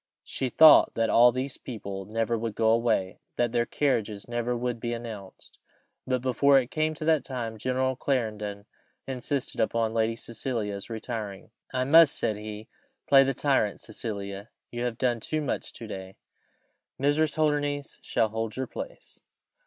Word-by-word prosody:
She 130 - -3
thought 155 +5 +7
that 115 -1 +1
all 120 +1 +7
these 130 +2 -4
people 100 -5 -6
never 115 +3 -1
would 115 -1 -3
go 110 -1 +3
away 115 -5 +1 0.2
that 120 -1 +1
their 120 0 +1
carriages 110 -8 -1
never 120 0 -1
would 120 -1 -2
be 120 0 -3
announced. 110 -5 -9 0.5
But 130 -1 0
before 140 +2 +4
it 130 -2 0
came 155 0 0
to 155 - -6
that 160 -2 +3
time, 115 -4 -5
General 130 +2 0
Clarendon 105 -6 -2 0.4
insisted 135 +1 -3
upon 110 0 +1
Lady 115 0 +1
Cecilia's 115 -3 -4
retiring. 110 -3 -6 0.2
"I 130 - 0
must," 160 +3 +6
said 110 - 0
he, 105 +1 -8 0.4
"play 135 -1 +7
the 135 -1 -1
tyrant, 130 -8 +1
Cecilia; 100 -2 -5 0.2
you 120 0 -3
have 120 -2 -3
done 125 -2 +1
too 155 +7 -2
much 145 -4 -3
to 115 - -8
day 95 -3 -8 0.8
Mrs. 145 +2 +2
Holdernesse 145 -2 -1
shall 115 -2 0
hold 110 +1 -4
your 130 - -1
place." - - -9
120 Hz, 160 wpm, -27 LUFS, 110-130 Hz, 0.8 s, thought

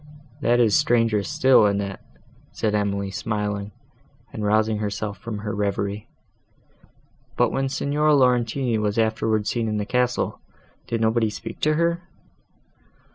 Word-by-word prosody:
"That 120 -2 +3
is 110 -4 +4
stranger 115 -7 +3
still, 120 +3 +4
Annette," 100 -1 -2 0.5
said 110 -1 -1
Emily, 100 -1 -1
smiling, 105 -1 -3 0.6
and 110 - -5
rousing 110 +1 +2
herself 105 0 -4
from 115 -2 -5
her 105 +1 -4
reverie. 100 0 -2 1.3
"But, - - +3
when 135 0 -1
Signora 150 +3 +1
Laurentini 125 -2 +2
was 105 0 -1
afterwards 110 -2 +1
seen 115 -2 -1
in 105 -1 -1
the 105 - -2
castle, 125 +2 -1 0.5
did 115 -1 -2
nobody 110 0 +2
speak 105 - -8
to 155 0 +2
her?" 170 +1 +1
110 Hz, 130 wpm, -23 LUFS, 105-120 Hz, 1.3 s, is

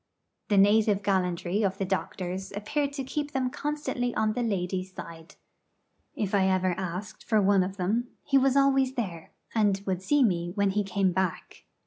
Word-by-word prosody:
The 205 - +2
native 205 0 +4
gallantry 185 0 0
of 195 -2 0
the 195 - -1
doctors 185 0 -3
appeared 280 +8 -1
to 275 -1 -3
keep 290 +3 -4
them 255 -1 0
constantly 290 -5 -2
on 215 0 +1
the 245 - -2
ladies' 185 -4 -2
side. 165 -2 -10 0.8
If 205 -2 -2
ever 190 -2 +2
I 180 +2 -4
asked 185 +3 -5
for 220 - +2
one 200 -1 +4
of 190 +2 -3
them, 215 +7 0 0.2
he 275 -1 +3
was 270 0 +3
always 270 -1 +3
there, 180 -9 -4 0.2
and 205 -3 +2
would 185 -2 -1
see 290 +8 +3
me 175 -5 0
when 200 -1 +2
he 205 +1 0
came 195 -1 +1
back. 185 -1 -3
200 Hz, 175 wpm, -27 LUFS, 185-240 Hz, 0.8 s, native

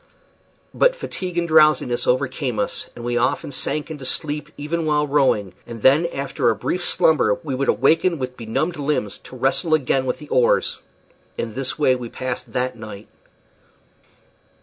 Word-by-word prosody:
But - - +3
fatigue 185 - -5
and 170 0 +1
drowsiness 155 -6 +4
overcame 130 -1 0
us, - - -2
and 120 - -8
we 120 0 0
often 140 +3 0
sank 150 +4 -2
into 150 -4 -7
sleep 150 +2 -2
even 155 +2 -2
while 150 -1 +2
rowing; 135 - +1
and 115 -2 -8
then 145 +6 +5
after 140 -6 -1
a 115 - +1
brief 175 - -2
slumber 155 - +3
we 145 -4 -3
would 135 +2 -1
awake 140 +6 +4
with 135 -9 -1
benumbed 135 +10 -2
limbs 140 -8 -1
to - - -13
wrestle 135 +6 +2
again 130 -2 0
with - - -1
the 150 -1 -12
oars. 125 -2 +2 0.6
In 115 -2 -3
this 130 +2 -3
way 130 -4 +3
we 125 -2 -6
passed 130 0 -5
that 125 0 -1
night. 110 -2 -10
135 Hz, 165 wpm, -21 LUFS, 125-155 Hz, 0.6 s, then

